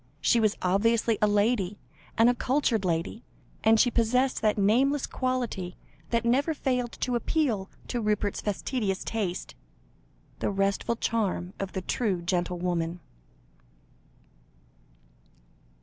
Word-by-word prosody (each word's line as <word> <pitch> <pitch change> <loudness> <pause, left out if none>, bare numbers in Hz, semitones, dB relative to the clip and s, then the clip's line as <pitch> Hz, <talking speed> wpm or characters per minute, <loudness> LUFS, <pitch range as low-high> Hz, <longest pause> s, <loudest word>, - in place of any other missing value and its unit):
She 235 - +3
was 215 -1 +2
obviously 225 +4 +2
a 210 - +5
lady, 205 -1 +1 0.4
and 225 +1 +6
a 245 - +5
cultured 250 -4 +1
lady, 170 +5 -2 0.4
and 220 0 +5
she 245 - +4
possessed 250 +3 +1
that 215 -1 +2
nameless 260 +8 +3
quality 245 -9 -2 0.3
which 235 0 +1
never 280 +7 +2
failed 250 -4 -1
to 250 - 0
appeal 235 -6 0 0.2
to 240 - -1
Rupert's 210 -1 0
fastidious 205 -1 -2
taste 195 -5 -3 0.9
the - - 0
restful 200 +3 0
charm 200 -6 -1
of 195 -1 -4
the 190 - -2
true 195 -8 -1
gentlewoman. 175 -1 -1
220 Hz, 120 wpm, -27 LUFS, 190-245 Hz, 0.9 s, and